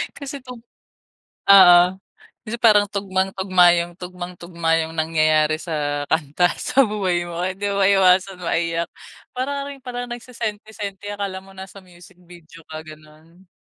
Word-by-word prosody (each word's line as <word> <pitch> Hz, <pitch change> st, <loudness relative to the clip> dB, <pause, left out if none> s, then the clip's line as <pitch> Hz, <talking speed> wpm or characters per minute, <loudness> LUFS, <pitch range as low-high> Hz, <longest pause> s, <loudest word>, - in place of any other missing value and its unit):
Kasi 280 Hz, -1 st, -7 dB
'tong 250 Hz, -2 st, -10 dB, 0.9 s
Oo. 180 Hz, -3 st, +9 dB, 0.6 s
Kasi 225 Hz, +2 st, -5 dB
parang 210 Hz, -3 st, +5 dB
tugmang-tugma 190 Hz, -2 st, +2 dB
yung 170 Hz, 0 st, -5 dB
tugmang 180 Hz, 0 st, -8 dB
tugma 170 Hz, -1 st, -1 dB
yung 160 Hz, 0 st, -4 dB
nangyayari 155 Hz, -1 st, +2 dB
sa 145 Hz, -3 st, -3 dB
kanta 160 Hz, +3 st, +1 dB
sa 275 Hz, -, +3 dB
buhay 190 Hz, -5 st, -1 dB
mo. 170 Hz, 0 st, -5 dB
Hindi 190 Hz, +3 st, -2 dB
maiiwasan 195 Hz, -1 st, +3 dB
maiyak. 170 Hz, 0 st, -1 dB, 0.4 s
Para 280 Hz, +2 st, -3 dB
ka 285 Hz, -, -7 dB
rin 275 Hz, -, -13 dB
palang 245 Hz, -1 st, -6 dB
nagsesenti-senti, 215 Hz, -4 st, -6 dB
akala 200 Hz, -2 st, -4 dB
mo 195 Hz, 0 st, -17 dB
nasa 190 Hz, +1 st, -10 dB
music 180 Hz, 0 st, -18 dB
video 170 Hz, -2 st, -16 dB
ka, 155 Hz, 0 st, -8 dB
gano'n. 155 Hz, +3 st, -17 dB
185 Hz, 135 wpm, -21 LUFS, 170-205 Hz, 0.9 s, Oo